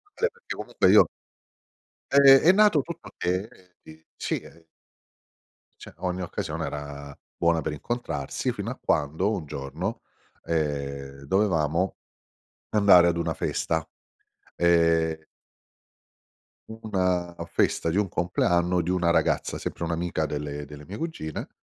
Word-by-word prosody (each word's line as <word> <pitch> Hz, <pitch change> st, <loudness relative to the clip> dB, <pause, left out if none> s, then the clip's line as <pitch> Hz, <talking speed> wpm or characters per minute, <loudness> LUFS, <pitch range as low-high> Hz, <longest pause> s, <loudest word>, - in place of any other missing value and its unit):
perché 475 Hz, +1 st, -3 dB
comunque -, -, +1 dB
io -, -, +7 dB, 1.0 s
Ehm, 140 Hz, -1 st, +8 dB
è 175 Hz, -, +6 dB
nato 205 Hz, -7 st, +5 dB
tutto 170 Hz, +4 st, -9 dB
che, 90 Hz, +4 st, -1 dB
eh, 90 Hz, -6 st, -23 dB
di 80 Hz, 0 st, -15 dB
sì, -, -, -2 dB
ehm 80 Hz, 0 st, -16 dB, 1.2 s
cioè -, -, -12 dB
ogni 90 Hz, 0 st, -2 dB
occasione 80 Hz, -2 st, -4 dB
era 70 Hz, -1 st, -7 dB, 0.2 s
buona 85 Hz, -1 st, +2 dB
per 80 Hz, -, -3 dB
incontrarsi 75 Hz, -, -3 dB
fino -, -, -5 dB
a -, -, -7 dB
quando, 80 Hz, +8 st, +1 dB
un 90 Hz, -8 st, -4 dB
giorno, 70 Hz, -1 st, -5 dB, 0.4 s
ehm, 70 Hz, -3 st, -3 dB
dovevamo 85 Hz, -1 st, +1 dB, 0.7 s
andare 100 Hz, -5 st, +6 dB
ad 85 Hz, -1 st, +1 dB
una 85 Hz, -, -1 dB
festa, 80 Hz, -1 st, -2 dB, 0.7 s
ehm 85 Hz, -2 st, +3 dB, 1.5 s
U 110 Hz, -, -9 dB
una 90 Hz, -4 st, 0 dB
festa 85 Hz, -, 0 dB
di 85 Hz, -, -1 dB
un 105 Hz, -1 st, +2 dB
compleanno 90 Hz, +1 st, +1 dB
di 85 Hz, -, -2 dB
una 90 Hz, -2 st, +2 dB
ragazza, 85 Hz, -, +1 dB
sempre -, -, -5 dB
un'amica 85 Hz, -1 st, -1 dB
delle 75 Hz, 0 st, -4 dB
delle 75 Hz, +1 st, -11 dB
mie 100 Hz, -, -7 dB
cugine, 160 Hz, -, -5 dB
85 Hz, 130 wpm, -26 LUFS, 75-95 Hz, 1.5 s, Ehm